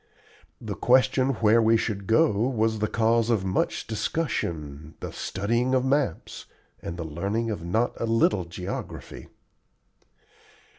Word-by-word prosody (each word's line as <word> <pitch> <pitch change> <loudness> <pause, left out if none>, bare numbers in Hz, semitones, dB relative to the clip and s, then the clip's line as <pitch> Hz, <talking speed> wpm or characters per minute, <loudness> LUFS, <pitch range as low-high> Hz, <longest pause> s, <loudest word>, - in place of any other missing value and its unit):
The - - -5
question 130 +1 +3
where 110 +2 +5
we 115 0 +4
should 100 -3 -3
go 155 +8 +4
was 110 0 0
the 105 - +1
cause 115 +1 +2
of 110 -5 +1
much 95 - -1
discussion, 80 - -3
the - - -6
studying 120 +7 -1
of 130 0 +1
maps, 135 - -1 0.3
and 85 - -6
the 85 - -4
learning 100 +9 -2
of 100 - -5
not 110 +8 0
a 115 - 0
little 110 -5 +2
geography. 90 +3 -7
110 Hz, 135 wpm, -26 LUFS, 95-120 Hz, 0.3 s, where